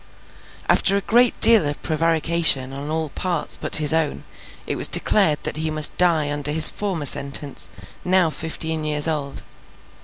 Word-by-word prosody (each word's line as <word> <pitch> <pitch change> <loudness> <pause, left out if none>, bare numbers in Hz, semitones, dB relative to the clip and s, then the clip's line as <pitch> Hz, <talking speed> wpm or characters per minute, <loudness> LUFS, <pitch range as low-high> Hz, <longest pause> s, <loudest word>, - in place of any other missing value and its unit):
After 195 +1 +2
a - - -3
great 240 +3 +1
deal 225 -9 +5
of 145 - -6
prevarication 160 -4 -1
on 140 +2 -8
all 160 0 -4
parts 175 0 -2
but - - 0
his 150 0 +2
own, 160 -2 -3 0.4
it - - -5
was - - +3
declared 160 -8 +2
that - - -5
he 160 0 -4
must 155 -1 +4
die 160 -5 -1
under 145 0 -4
his 155 +1 +7
former 190 -7 -6
sentence, 140 +1 0 0.3
now 180 -3 0
fifteen 160 0 -5
years 150 0 +2
old. 145 -3 -5
155 Hz, 160 wpm, -19 LUFS, 150-170 Hz, 0.4 s, his